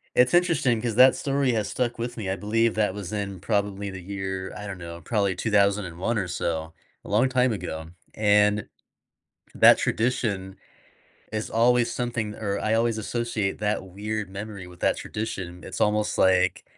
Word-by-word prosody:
it's 125 Hz, +6 st, +4 dB
interesting 155 Hz, -, +3 dB
'cause 115 Hz, -3 st, -2 dB
that 130 Hz, +1 st, +8 dB
story 140 Hz, -2 st, 0 dB
has 110 Hz, -2 st, -1 dB
stuck 120 Hz, -2 st, -2 dB
with 120 Hz, +1 st, -4 dB
me, 100 Hz, -4 st, -4 dB
I 95 Hz, -, 0 dB
believe 115 Hz, +3 st, +1 dB
that 105 Hz, -3 st, +1 dB
was 100 Hz, -1 st, -6 dB
in 100 Hz, -3 st, -3 dB
probably 100 Hz, -1 st, -1 dB
the 95 Hz, -1 st, -8 dB
year, 95 Hz, 0 st, -4 dB
I 105 Hz, -, -7 dB
don't 95 Hz, -2 st, -6 dB
know, 85 Hz, 0 st, -8 dB
probably 100 Hz, -4 st, 0 dB
2001 100 Hz, 0 st, +1 dB
or 95 Hz, -3 st, -1 dB
so, 80 Hz, -2 st, -3 dB, 0.3 s
a -, -, -9 dB
long 115 Hz, +6 st, +3 dB
time 130 Hz, -1 st, +2 dB
ago, 80 Hz, -4 st, -5 dB, 0.3 s
and 105 Hz, -1 st, +3 dB, 0.9 s
that -, -, +8 dB
tradition 110 Hz, -5 st, -1 dB, 0.8 s
is 110 Hz, 0 st, -3 dB
always 120 Hz, +1 st, +3 dB
something 115 Hz, -4 st, -2 dB
or 100 Hz, -2 st, -2 dB
I 110 Hz, +1 st, +1 dB
always 115 Hz, -1 st, +1 dB
associate 110 Hz, -2 st, -2 dB
that 105 Hz, -2 st, -1 dB
weird 105 Hz, +2 st, -4 dB
memory 100 Hz, -1 st, -7 dB
with 90 Hz, -1 st, -14 dB
that -, -, +2 dB
tradition, 95 Hz, -5 st, -5 dB
it's -, -, -7 dB
almost 105 Hz, 0 st, +1 dB
like 95 Hz, -1 st, +3 dB
105 Hz, 170 wpm, -25 LUFS, 95-115 Hz, 0.9 s, that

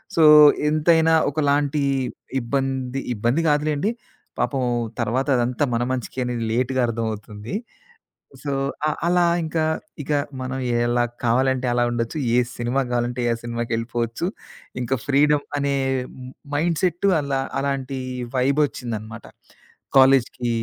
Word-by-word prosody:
So, 165 Hz, -, +4 dB, 0.5 s
ఎంతైనా 160 Hz, +1 st, +3 dB, 0.2 s
ఒకలాంటి 145 Hz, 0 st, +1 dB, 0.6 s
ఇబ్బంది, 135 Hz, +1 st, -2 dB
ఇబ్బంది 120 Hz, +9 st, +1 dB
కాదులెండి, 150 Hz, +5 st, +1 dB, 0.5 s
పాపం 135 Hz, -2 st, 0 dB, 0.4 s
తర్వాత 130 Hz, +5 st, 0 dB
అదంతా 120 Hz, +3 st, 0 dB
మన 120 Hz, -, +1 dB
మంచికే 130 Hz, 0 st, -4 dB
అనేది 120 Hz, -2 st, -2 dB
లేట్‌గా 130 Hz, +1 st, +1 dB
అర్థమవుతుంది. 110 Hz, -, -4 dB, 0.9 s
సో, 140 Hz, -1 st, -2 dB, 0.3 s
అ -, -, +2 dB, 0.2 s
అలా 175 Hz, 0 st, +3 dB, 0.2 s
ఇంకా 155 Hz, 0 st, 0 dB, 0.4 s
ఇక 150 Hz, -, -5 dB, 0.3 s
మనం 130 Hz, +1 st, -3 dB, 0.3 s
ఎలా 120 Hz, 0 st, +2 dB, 0.2 s
కావాలంటే 130 Hz, +2 st, +2 dB
అలా 120 Hz, -, +2 dB
ఉండొచ్చు, 115 Hz, +4 st, -2 dB, 0.2 s
ఏ -, -, +6 dB, 0.2 s
సినిమా 120 Hz, +3 st, 0 dB
కావాలంటే 120 Hz, 0 st, -1 dB
ఆ -, -, -2 dB
సినిమాకెళ్ళిపోవచ్చు. 115 Hz, +3 st, -2 dB, 0.5 s
ఇంకా 130 Hz, +2 st, 0 dB
ఫ్రీడమ్ 145 Hz, +1 st, +3 dB
అనే 140 Hz, 0 st, 0 dB, 0.8 s
మైండ్ 165 Hz, +1 st, 0 dB
సెట్టు 180 Hz, +2 st, +2 dB
అలా, 140 Hz, -1 st, -1 dB, 0.2 s
అలాంటి 135 Hz, -1 st, -2 dB, 0.4 s
వైబొచ్చిందనమాట. 125 Hz, -5 st, -1 dB, 0.7 s
కాలేజుకి 130 Hz, -2 st, +4 dB
130 Hz, 110 wpm, -22 LUFS, 120-145 Hz, 0.9 s, ఏ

